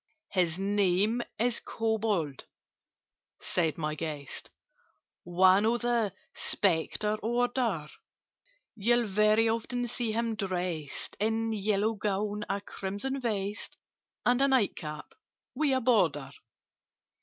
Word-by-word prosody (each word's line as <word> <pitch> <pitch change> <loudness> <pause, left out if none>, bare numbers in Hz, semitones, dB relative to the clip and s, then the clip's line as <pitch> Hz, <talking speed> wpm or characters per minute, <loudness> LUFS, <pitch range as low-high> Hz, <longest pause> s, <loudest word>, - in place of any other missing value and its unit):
"His 175 -3 +1
name 200 +3 +2 0.2
is 240 0 +1
Kobold," 215 -10 -1 0.9
said 165 -5 0
my 155 -2 -2
guest: 150 -2 -5 0.8
"One 185 +3 +5
of 230 +2 +2
the 235 -4 +1 0.2
Spectre 205 +3 +1
order: 240 - 0 0.9
You'll 235 +3 +2
very 215 +2 +3
often 240 +2 -1
see 235 -1 -1
him 230 +1 0
dressed 180 -7 -3
In 225 +1 0
a - - -1
yellow 210 +1 +1
gown, 210 0 -2
a 200 - -1
crimson 205 +8 -3
vest, 205 -3 -3 0.5
And 245 +2 +3
a 275 - +5
night 260 -7 +3
cap 150 -2 -7 0.4
with 300 -2 +1
a 260 - +3
border. 180 - +2
210 Hz, 110 wpm, -30 LUFS, 185-230 Hz, 0.9 s, One